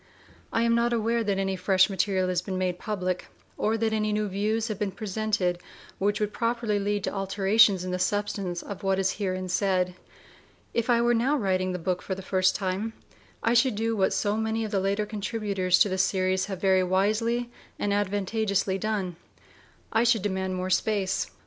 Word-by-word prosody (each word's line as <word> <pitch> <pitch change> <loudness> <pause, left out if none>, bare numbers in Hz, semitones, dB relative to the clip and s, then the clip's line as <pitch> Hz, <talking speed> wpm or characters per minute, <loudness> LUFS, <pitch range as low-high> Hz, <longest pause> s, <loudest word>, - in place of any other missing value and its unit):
I 230 - +1
am 235 0 +3
not 235 +1 +2
aware 230 0 +1
that 200 -2 0
any 195 0 0
fresh 190 +1 +3
material 190 -1 0
has 180 -1 0
been 185 0 -4
made 180 -1 -1
public, 185 -4 -3 0.3
or 220 +1 0
that 220 0 0
any 215 -1 0
new 210 0 0
views 215 +3 -1
have 215 -4 -4
been 210 - 0
presented 195 -3 -1 0.4
which 205 +1 +1
would 210 -1 -1
properly 230 -3 0
lead 205 0 -1
to - - -2
alterations 195 0 +3
in 185 - -4
the 180 - -2
substance 200 -2 -1
of 200 -2 -7
what 195 -1 +1
is 190 0 +1
herein 185 -2 -2
said. 185 -1 +1 0.8
If 235 +1 -1
I 235 -1 +4
were 240 0 +3
now 255 +6 +2
writing 185 -5 0
the 180 - -2
book 180 +1 -2
for 190 - -3
the 190 - -8
first 185 0 +2
time, 195 +3 -2 0.5
I 230 - +3
should 240 -1 +3
do 225 +2 0
what 190 -2 +2
so 205 0 0
many 220 0 -1
of 215 - -6
the 200 - +1
later 200 +2 0
contributors 205 -3 0
to 210 - +5
the 190 0 -2
series 185 0 +1
have 190 -3 -5
very 190 -1 +3
wisely 220 +6 +1 0.3
and 205 - 0
advantageously 200 -1 0
done: 195 -5 -2 0.8
I 225 - +4
should 230 -4 +3
demand 190 -2 -1
more 185 0 -3
space. 195 -1 0
200 Hz, 195 wpm, -27 LUFS, 185-220 Hz, 0.8 s, to